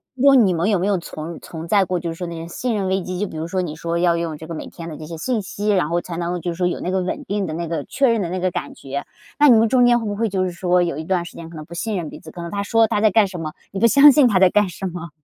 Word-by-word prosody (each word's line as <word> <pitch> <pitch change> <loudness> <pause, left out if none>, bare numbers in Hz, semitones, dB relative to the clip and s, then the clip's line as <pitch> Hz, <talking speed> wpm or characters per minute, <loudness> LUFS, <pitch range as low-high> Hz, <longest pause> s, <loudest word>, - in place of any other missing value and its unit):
是 260 - -7
说 275 0 +7
你 210 -8 +5
们 170 +4 0
有 205 - +3
没 180 - -1
有 200 -1 +2
存 165 -1 -7
存 165 0 -8
在 195 +2 +3
过 180 -1 -1
就 170 -1 -4
是 - - -7
说 175 +1 -5
那 170 - -6
些 165 0 -7
信 235 +7 -2
任 195 -2 -1
危 190 +1 0
机， 180 0 -5
就 205 - 0
比 - - -10
如 160 +1 -3
说 185 +1 -1
你 155 -3 -5
说 170 +1 -3
要 170 -1 +3
用 165 -2 -3
这 160 - -10
个 165 - -7
每 155 - -6
天 165 -1 -9
的 155 - -7
这 155 - -8
些 165 0 -7
信 220 +7 -1
息， 205 +2 -4
然 185 -7 +2
后 170 +1 0
才 170 -1 -7
能 175 +1 -2
就 175 - -2
是 - - -6
说 180 -1 +1
有 180 - -2
那 180 - -2
个 190 0 +1
稳 180 - -3
定 200 -1 -2
的 155 - -4
那 170 0 -3
个 160 -3 -3
确 275 -2 +1
认 230 -2 +1
的 175 - -2
那 185 +1 -3
个 185 0 0
感 - - -5
觉。 140 +1 -6 0.3
那 295 - +7
你 235 - +7
们 225 +1 +4
中 250 0 +4
间 240 0 +4
会 225 - -5
不 205 -1 -2
会 225 +1 0
就 190 -1 0
是 185 - -1
说 180 0 +1
有 170 -5 -2
一 155 - -4
段 175 +1 -1
时 - - -11
间 165 -1 -9
可 170 - -12
能 155 -1 -8
不 170 - -12
信 210 +4 -2
任 170 -3 -4
彼 - - -10
此， 160 - -12
可 175 - -9
能 170 - -6
他 200 - -2
说 225 +3 +3
他 205 - 0
在 215 - +5
干 210 0 +4
什 185 -2 -7
么， 155 -1 -5 0.2
你 195 - -4
不 230 - +5
相 280 +5 +8
信 280 -2 +5
他 210 -5 +2
在 190 -1 +6
干 210 -2 +3
什 185 +2 -7
么？ 175 -2 -5
180 Hz, 395 characters per minute, -21 LUFS, 170-205 Hz, 0.3 s, 相